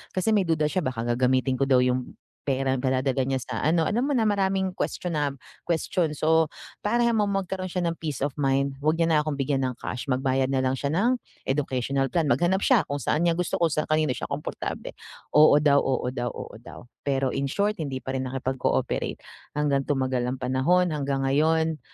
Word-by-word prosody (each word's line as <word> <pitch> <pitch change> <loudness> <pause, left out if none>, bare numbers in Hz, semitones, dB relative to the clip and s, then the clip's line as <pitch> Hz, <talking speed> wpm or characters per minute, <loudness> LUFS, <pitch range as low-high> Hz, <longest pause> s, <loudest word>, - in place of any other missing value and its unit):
kasi 185 +4 +1
may 200 -4 +3
duda 155 -2 +2
siya 185 +5 0
baka 120 -3 -2
gagamitin 130 0 +2
ko 135 - +2
daw 125 -1 +5
yung 125 0 0 0.3
pera 135 -1 0
padadala 130 +1 0
niya 135 0 -1
sa 120 - -5
ano 160 +1 +2
alam 235 +5 +1
mo 290 - 0
na 220 -3 +2
maraming 190 -2 0
question 175 -3 -3
na 145 -2 0 0.3
question. 170 -1 0
So 160 +1 +2 0.3
para 235 +3 +1
magkaroon 195 -3 -1
siya 180 -2 -1
ng 165 - -1
peace 150 -5 -4
of 140 -1 -2
mind 140 -1 +1
wag 155 +2 +2
niya 165 - +3
na 155 - +4
akong 150 -2 -3
bigyan 135 0 0
ng 130 -1 -1
cash 125 +3 -4
magbayad 130 +1 +1
na 135 - +1
lang 130 0 +1
siya 140 +2 -2
ng 230 +10 +2 0.3
Educational 135 -1 0
Plan, 165 -4 +1
maghanap 175 +6 +2
siya 250 -6 +4
kung 145 0 -3
saan 150 +6 0
niya - - +4
gusto 180 -1 -1
ko 170 - +4
sa 155 - -1
kanino 155 -2 +2
siya - - -4
komportable. 140 +2 -4 0.4
Oo 150 -1 +8
daw, 145 -1 +4
oo 130 -2 -1
daw, 120 -1 -3
oo - - -8
daw. 120 - -12 0.2
Pero 135 -1 +1
in 140 0 -1
short 205 +6 0
hindi 135 -4 -3
pa 130 - -4
rin 130 0 -2
nakipag-cooperate. 130 0 -1 0.4
Hanggang 140 -2 +1
tumagal 130 -3 0
ng 130 - -1
panahon, 140 +8 +2
hanggang 140 -2 -1
ngayon, 160 +2 +2
145 Hz, 200 wpm, -26 LUFS, 130-170 Hz, 0.4 s, Oo